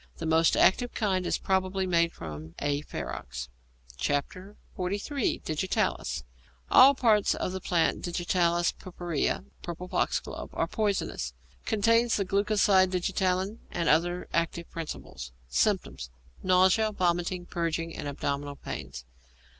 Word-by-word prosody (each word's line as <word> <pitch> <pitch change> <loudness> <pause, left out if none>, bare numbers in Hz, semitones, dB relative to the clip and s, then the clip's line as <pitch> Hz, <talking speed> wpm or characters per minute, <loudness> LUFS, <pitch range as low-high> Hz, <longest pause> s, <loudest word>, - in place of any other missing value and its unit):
The - - -5
most 160 0 +3
active 245 +5 +3
kind 190 -4 0
is - - +1
probably 190 0 0
made 170 -2 +2
from 80 - -8
A. 145 0 -1
ferox. 60 - -6 0.5
XLIII. 195 - -2
DIGITALIS 150 - -1 0.5
All 275 +2 +8
parts 220 -5 +3
of - - -2
the 190 0 -5
plant 170 -2 +1
Digitalis 175 -1 +1
purpurea 175 - -2 0.2
(purple 175 +1 -6
foxglove) - - -2
are - - +1
poisonous. 200 - -2 0.3
Contains 230 +2 +3
the 200 - 0
glucoside 200 -1 +3
digitalin 185 +3 0
and 170 -1 -2
other 175 +3 +2
active 170 0 -1
principles. 150 - -7 0.2
Symptoms. 60 0 0 0.3
Nausea, 185 +4 +4
vomiting, 175 -1 0
purging, 165 -1 -2
and - - -5
abdominal 140 0 -3
pains. 65 - -7
175 Hz, 115 wpm, -28 LUFS, 160-190 Hz, 0.5 s, All